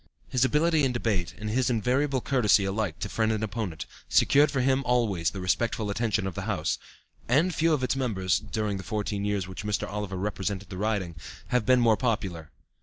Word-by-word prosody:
His 125 -1 +2
ability 155 +3 +3
in 130 -2 +2
debate, 105 -7 -1
and 105 - -5
his 130 +2 +1
invariable 130 +4 +1
courtesy 110 -7 +3
alike 95 -4 -2
to - - -1
friend 110 -1 0
and 110 0 -1
opponent, 100 -7 -4 0.2
secured 145 +2 +5
for 140 -3 0
him 135 +1 +2
always 110 -10 +1
the 100 - -7
respectful 110 +4 0
attention 110 -1 0
of 95 - -3
the - - -4
House, - - -1 0.5
and 155 +9 +3
few 165 +1 +2
of 145 -4 +1
its 130 - +1
members, 100 -9 0
during 105 0 -3
the 95 - -7
fourteen 105 -1 -2
years 100 -3 -1
which 95 +2 -7
Mr. 105 -1 -1
Oliver 105 -2 -4
represented 100 0 -3
the 90 - -6
riding, 100 -5 -2 0.3
have 125 -4 +1
been 130 -1 +5
more 115 -3 +4
popular. 95 - -2
110 Hz, 195 wpm, -27 LUFS, 100-125 Hz, 0.5 s, secured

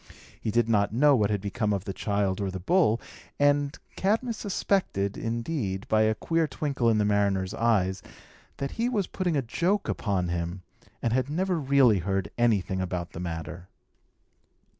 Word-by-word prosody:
He - - -2
did 115 +1 +2
not 105 -3 +2
know 145 +3 +5
what 105 -4 +2
had 105 -2 -1
become 105 +2 -1
of 100 -1 -3
the 95 - -4
child 100 -1 -1
or 100 - -1
the 95 0 -5
bull; 115 - +3 0.4
and 145 0 +2 0.2
Cadmus 225 +4 0
suspected, 185 - -1
indeed, 115 -4 -3
by 110 0 +3
a 110 0 +3
queer 165 +6 0
twinkle 135 -4 0
in 110 - +3
the 105 - +2
mariner's 100 -2 +1
eyes, 100 -5 +1 0.6
that 140 0 -3
he 235 +2 -1
was 210 -6 0
putting 175 -5 -1
a 135 - 0
joke 180 - 0
upon 95 -5 -1
him, 85 +1 -3 0.4
and 115 - +1
had 130 +1 +1
never 180 +3 0
really 135 -7 +4
heard 95 -1 -2
anything 100 -6 +1
about 90 -1 -3
the - - -8
matter. 85 +1 -6
110 Hz, 170 wpm, -27 LUFS, 95-145 Hz, 0.6 s, know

